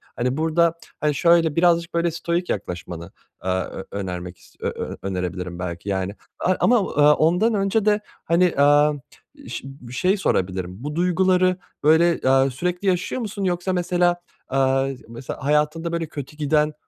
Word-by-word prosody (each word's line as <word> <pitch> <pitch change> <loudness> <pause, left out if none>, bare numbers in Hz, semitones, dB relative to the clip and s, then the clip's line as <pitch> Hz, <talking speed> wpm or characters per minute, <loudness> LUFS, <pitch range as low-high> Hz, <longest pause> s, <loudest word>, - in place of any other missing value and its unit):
Hani 125 +3 -1
burada, 165 +1 +2 0.3
hani, 150 -1 +1
şöyle 165 -2 +4
birazcık 170 0 +3
böyle 170 0 +1
stoic 170 +2 -2
yaklaşmanı, 85 -3 -6 0.3
eee, 95 - -2
ö 95 +1 -2
önermek 90 -3 -5
is - - -21
ö - - -2
ö - - -5
önerebilirim 90 -2 -4
belki 90 +2 -5
yani, 95 +1 -2 0.2
aaa, 185 - +2
ama, 225 -9 +2
aaa, 150 0 +6
ondan 180 +10 +2
önce 200 +1 +1
de, 210 0 +3 0.3
hani, 170 +2 +3
eee, 145 -2 +4 0.6
ş - - -5
bir 125 -3 -11
şey 190 +8 +2
sorabilirim, 95 - -1
bu 150 +1 -4
duyguları 185 +1 +2 0.3
böyle, 165 +3 +5
eee, 135 +1 +3
sürekli 180 +8 -3
yaşıyor 185 +7 0
musun 205 -2 -4
yoksa 180 0 0
mesela, 175 0 +1 0.3
eee, 135 0 +1
mesela 115 +3 -8
hayatında 150 +3 +1
böyle 170 -1 -1
kötü 145 0 -8
giden 150 0 +1
155 Hz, 155 wpm, -22 LUFS, 125-175 Hz, 0.6 s, aaa